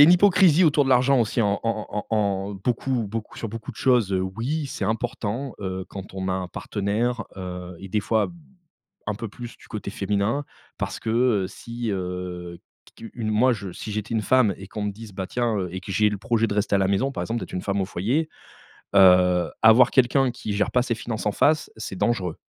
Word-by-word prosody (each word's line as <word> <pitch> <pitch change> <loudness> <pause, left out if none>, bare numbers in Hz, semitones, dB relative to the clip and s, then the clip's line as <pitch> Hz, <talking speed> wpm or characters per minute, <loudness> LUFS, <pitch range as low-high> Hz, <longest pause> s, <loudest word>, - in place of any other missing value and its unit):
a - - +12
une 170 - +7
hypocrisie 185 -2 +5
autour 145 -2 +4
de - - -2
l'argent 130 +1 +4
aussi 115 +2 0
en 100 -2 +1
en 115 -2 -2
en 105 - -4
en 110 - +2
en 100 -1 0
beaucoup 120 +3 -1
beaucoup 110 0 -6
sur 115 - -4
beaucoup 115 +5 -7
de 115 - -14
choses. 120 -7 +3
Oui 115 +12 -1
c'est 105 - -4
important, 115 +3 -2
heu, 95 -1 -4
quand 95 -1 -8
on 95 0 -3
a - - +1
un 95 -1 -3
partenaire, 115 +6 -2
heu 90 -1 -6
et 95 - -9
des 105 +3 0
fois, 110 +2 +1 0.8
un 105 - -1
peu 115 +1 -5
plus 120 +3 -9
du - - -18
côté 105 -2 -5
féminin. 105 +8 -1 0.3
Parce - - -3
que, 110 - -4
heu, 115 -5 +2
si, 115 +3 -6
heu, 90 -2 -5 0.4
qu 115 - -9
une 110 -3 -2
moi, 125 +4 +4
je 100 -5 -4
si 105 - -7
j'étais 105 +2 -3
une 110 - +1
femme 120 -4 +3
et 95 - -10
qu'on 105 0 -5
me 105 - -1
dise: 110 0 -11
«Bah, 95 0 -4
tiens, 120 +2 -1
heu» 90 -2 -2
et 95 - -4
que 95 +2 -8
j'ai 105 +2 +3
le 105 - -3
projet 115 +2 +1
de 100 - -2
rester 105 0 +1
à - - +5
la 95 -1 +2
maison, 115 +8 +1
par - - -4
exemple, 115 +1 -2
d'être - - -8
une 90 - -2
femme 100 -1 0
au - - 0
foyer, 130 - -1 0.7
heu, 90 -2 +6
avoir 115 +3 +7
quelqu'un 130 0 +3
qui 110 -3 -5
gère 105 +1 0
pas 125 - +3
ses 120 -2 -1
finances 110 -2 -5
en 105 - +2
face, 155 +1 +2
c'est 110 -4 -6
dangereux. 95 -8 0
110 Hz, 230 wpm, -24 LUFS, 95-120 Hz, 0.8 s, a